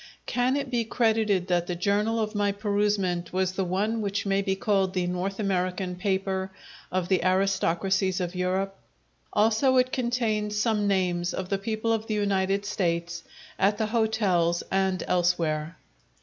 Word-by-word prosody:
Can 250 +2 +1
it 275 -2 -3
be 240 -2 +1
credited 220 -5 +1
that 175 -1 +1
the 180 - -2
journal 205 +5 +1
of 215 -1 -1
my 205 -1 +1
perusement 200 -4 0
was 185 0 0
the 190 +1 -2
one 205 +5 -1
which 200 0 -2
may 195 0 +2
be 195 -1 0
called 195 -1 0
the 180 -1 +1
North 180 +3 -3
American 185 -2 -1
paper 190 0 -1 0.4
of 185 -1 -1
the 185 -2 +2
aristocracies 190 0 +1
of 175 -1 -3
Europe? 190 +2 -1 0.6
Also, 225 +5 +3
it 255 0 +3
contains 225 -4 -1
some 215 -2 +1
names 180 -3 0
of 185 -1 -4
the 195 - 0
people 220 +2 -1
of 225 0 -2
the 215 - -1
United 200 -1 0
States 170 -3 -2 0.4
at 200 +2 +3
the 220 - 0
hotels 210 -7 +1
and 190 -1 +1
elsewhere. 170 -2 0
195 Hz, 160 wpm, -26 LUFS, 180-215 Hz, 0.6 s, Also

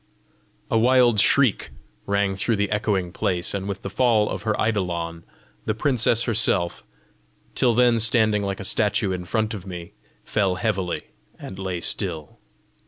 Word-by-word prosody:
A 115 - +3
wild 120 -2 +4
shriek 135 0 +3 0.4
rang 100 -1 0
through 110 +4 0
the 100 -1 -1
echoing 100 -4 -1
place, 90 -1 -1
and 100 0 -4
with 100 0 -5
the 100 - -4
fall 110 -1 +2
of - - -4
her 110 -1 -1
eidolon, 85 -6 -2 0.4
the 110 - -1
princess 120 -2 +1
herself, 105 -6 0 0.7
till 120 -3 +2
then 120 -1 +4
standing 110 -2 +4
like 100 -1 -3
a 100 - -5
statue 105 0 +1
in 90 -1 -4
front 110 +3 -1
of 100 -3 -8
me, 85 -2 -8 0.3
fell 100 -3 0
heavily, 95 -3 -2 0.4
and 95 - -9
lay 95 -3 -4
still. 85 -7 -3
100 Hz, 155 wpm, -23 LUFS, 95-110 Hz, 0.7 s, wild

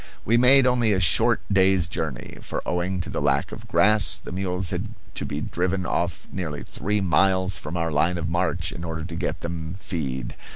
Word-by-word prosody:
We 115 - +3
made 125 +2 +6
only 120 -4 +3
a 95 - +1
short 110 +7 +4
day's 95 -2 +4
journey, 80 -6 -5
for, - - -5
owing 90 +1 -1
to 85 - -5
the - - -2
lack - - +1
of - - -9
grass, 105 0 +4
the - - -10
mules 90 -1 -1
had 90 +4 -2 0.3
to - - -4
be 75 - -3
driven 90 +3 -1
off 85 0 -2
nearly 80 -6 -4
three 105 +1 -2
miles 95 0 +2
from 75 +4 -5
our 85 -1 -1
line 80 +4 +1
of 85 -1 -3
march, 85 -1 0
in 85 +5 -7
order 80 -1 -4
to 85 -1 -7
get 85 -1 -3
them 85 0 -5
feed. 70 -8 -4
90 Hz, 200 wpm, -24 LUFS, 85-95 Hz, 0.3 s, made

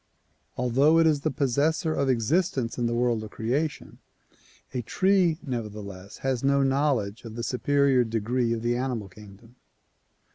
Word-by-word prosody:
Although 135 +6 +3
it 165 - +5
is 150 -3 +2
the 155 - 0
possessor 150 +4 0
of 140 -3 0
existence 130 - 0
in 120 - +1
the 120 - -1
world 120 -2 +1
of 110 - -8
creation, 135 +9 -3 0.7
a 125 - -1
tree 185 - +2
nevertheless 105 -6 -6
has 130 -2 0
no 140 0 +3
knowledge 135 -6 0
of 115 -2 -9
the 120 - -4
superior 135 0 +2
degree 115 +2 -1
of 115 -1 -2
the 120 0 +1
animal 120 -5 -3
kingdom. 105 +4 -16
125 Hz, 150 wpm, -26 LUFS, 115-140 Hz, 0.7 s, it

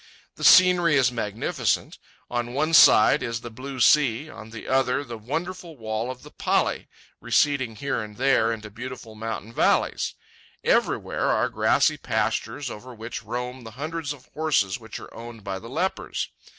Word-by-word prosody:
The - - -10
scenery 180 -4 +7
is 130 -3 +4
magnificent; 115 - -2 0.3
on 120 0 -3
one 155 +3 0
side 145 -1 +7
is 115 0 -3
the 120 - -8
blue 130 +3 -7
sea, 145 +1 +3
on 110 -1 -11
the 110 -1 -9
other 135 +1 +1
the 120 -4 -7
wonderful 165 +8 -5
wall 110 +1 -3
of 130 -1 -7
the - - -13
pali, - - 0 0.3
receding 130 -6 +1
here 140 +1 -2
and 105 -1 -9
there 130 -3 +3
into 110 -2 -6
beautiful 120 0 -8
mountain 110 0 -6
valleys. - - +1 0.5
Everywhere - - +1
are - - +2
grassy - - +2
pastures 135 -3 -2
over 125 +4 -10
which 110 -1 -6
roam 125 +3 -5
the 115 - -8
hundreds 155 0 -4
of 135 -3 -9
horses 145 -12 +1
which 110 -3 -8
are - - -12
owned 115 -2 -10
by 95 -1 -4
the 115 - -10
lepers. 180 +8 -2
125 Hz, 165 wpm, -25 LUFS, 115-145 Hz, 0.5 s, scenery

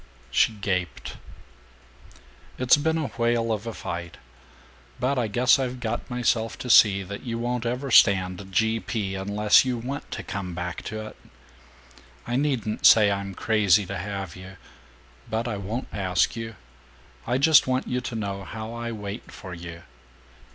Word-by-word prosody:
She 110 - +3
gaped. 95 -5 -3 1.4
"It's 130 0 +5
been 160 +2 0
a 155 -3 -1
whale 115 -1 0
of 110 +1 -3
a 115 - -4
fight. 85 0 -6 0.8
But 130 +1 +1
I 120 - 0
guess 125 +6 +4
I've 130 -1 -3
got 120 -1 -4
myself 120 -2 0
to 125 - -2
see 100 -2 +6
that 100 +2 -7
you 115 -3 -4
won't 120 0 -2
ever 125 +3 -3
stand 95 -2 +4
G. 110 +3 +2
P. 105 -4 -3
unless 100 +2 +3
you 130 -2 -1
WANT 130 +5 -6
to - - -5
come 90 -3 -5
back 90 0 -4
to 110 0 -5
it. 110 - -11 1.1
I 120 - -2
needn't 130 -6 -1
say 105 -2 +7
I'm 100 -1 -3
crazy 105 -3 +3
to 100 +1 -5
have 95 -2 -5
you. 95 0 -11 0.7
But 115 +2 -1
I 110 -4 -3
won't 110 +6 -4
ask 95 -1 +1
you. 115 -1 -6 0.7
I 125 - +1
just 150 +1 +5
want 130 0 0
you 125 0 -1
to 120 -1 -5
know 100 -3 -4
how 110 +4 -7
I 120 0 -4
wait 105 0 -7
for 95 -2 -9
you. 85 0 -9
110 Hz, 165 wpm, -25 LUFS, 100-120 Hz, 1.4 s, say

